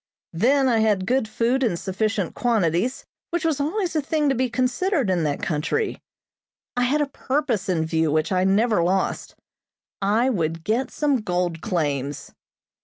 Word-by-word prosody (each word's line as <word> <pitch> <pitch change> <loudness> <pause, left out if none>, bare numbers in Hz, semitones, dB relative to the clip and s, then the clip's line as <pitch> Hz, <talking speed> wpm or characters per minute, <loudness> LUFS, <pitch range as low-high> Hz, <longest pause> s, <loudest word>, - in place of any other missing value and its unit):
Then 260 +10 +3
I 235 -3 +3
had 210 -4 +2
good 250 +1 +1
food 240 +4 0
in 225 -9 +1
sufficient 200 0 -2
quantities, 220 -1 0 0.2
which 345 -1 -2
was 315 -3 +1
always 345 +4 -1
a 310 - +2
thing 295 0 0
to - - +3
be 255 +1 0
considered 255 - 0
in 180 -2 +1
that 145 -1 -2
country. 160 - -1 0.7
I 245 0 +2
had 290 +4 +1
a - - +2
purpose 265 -7 -2
in 165 -3 +1
view 160 -1 +1
which 155 +3 0
I 185 -1 +2
never 205 +1 +3
lost. 185 +3 -1 0.7
I 215 +5 +2
would 165 -8 -1
get 235 +7 0
some 290 -3 +1
gold 180 -6 -2
claims. 145 -5 -2
220 Hz, 165 wpm, -23 LUFS, 175-265 Hz, 0.7 s, Then